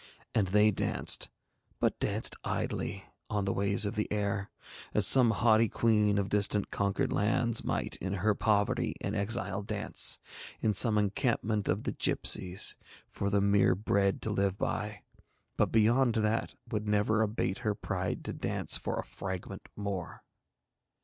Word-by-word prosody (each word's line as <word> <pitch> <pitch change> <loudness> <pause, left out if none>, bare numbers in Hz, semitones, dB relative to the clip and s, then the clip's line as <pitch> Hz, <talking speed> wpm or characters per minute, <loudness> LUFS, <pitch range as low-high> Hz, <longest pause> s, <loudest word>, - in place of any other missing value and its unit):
And 105 -4 +1
they 105 +3 +4
danced, 95 - +1 0.5
but - - 0
danced - - 0
idly, - - -3 0.3
on 105 -2 -1
the 95 - 0
ways 100 +1 +2
of 100 - -2
the 105 -2 -3
air, 100 -1 -2 0.5
as - - +5
some 125 -3 +7
haughty 115 0 +3
queen 105 -3 +2
of 100 -1 0
distant 105 0 +1
conquered 100 -1 -1
lands 115 +3 +1
might - - -3
in 95 +1 -4
her 105 +2 +1
poverty 105 0 0
and 100 +2 -4
exile 100 -1 -1
dance, 105 0 0 0.4
in 110 - +1
some 105 +2 +5
encampment 105 0 0
of - - 0
the - - -2
gipsies, 90 +1 +1 0.3
for 100 - -2
the 100 0 +1
mere 100 -1 +3
bread 100 0 0
to 110 - -1
live 100 -1 0
by, 105 0 -3 0.5
but - - +1
beyond 115 +2 +3
that 110 +1 -1 0.2
would 105 -2 -3
never 105 +1 +1
abate 105 -2 -1
her 110 -4 -1
pride 90 -3 -4
to - - -4
dance - - +1
for - - -4
a - - -2
fragment 95 -2 -7
more. 100 -3 -5
105 Hz, 155 wpm, -30 LUFS, 100-110 Hz, 0.5 s, some